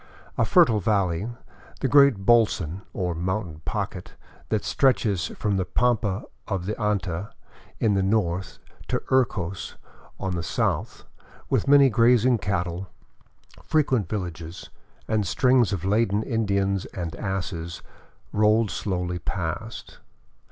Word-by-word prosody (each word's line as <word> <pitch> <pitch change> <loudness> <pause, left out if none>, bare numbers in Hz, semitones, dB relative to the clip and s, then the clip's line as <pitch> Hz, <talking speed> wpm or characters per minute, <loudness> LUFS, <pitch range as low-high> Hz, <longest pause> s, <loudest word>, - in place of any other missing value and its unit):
A - - +2
fertile 110 -3 +5
valley, 100 -1 0 0.5
the - - +2
great 140 -1 +6
holson, 100 -7 +3
or 90 -2 -2
mountain 90 -2 -3
pocket, - - -4 0.3
that 110 -2 0
stretches 110 - +2
from 100 -2 -2
the 95 - +1
pampa 110 +1 0 0.2
of 95 -4 -2
Anta 100 -3 -2 0.5
in 110 -3 +2
the 95 - +2
north 95 -3 0 0.3
to - - 0
Urcos 100 -8 0 0.4
on 95 - -2
the 85 - -2
south, 85 - -2 0.5
with - - +1
many 140 -2 +6
grazing 120 +1 +4
cattle, 95 -2 -2 0.7
frequent 130 - +1
villages, 85 -4 -6 0.4
and 105 -3 0
strings 125 -3 +3
of 95 -3 -3
laden 105 +1 +2
Indians 100 -5 0
and 85 -4 -6
asses, 90 -3 -4 0.5
rolled 105 0 +3
slowly 90 -3 -2
past. 90 +6 -5
100 Hz, 115 wpm, -25 LUFS, 90-115 Hz, 0.7 s, great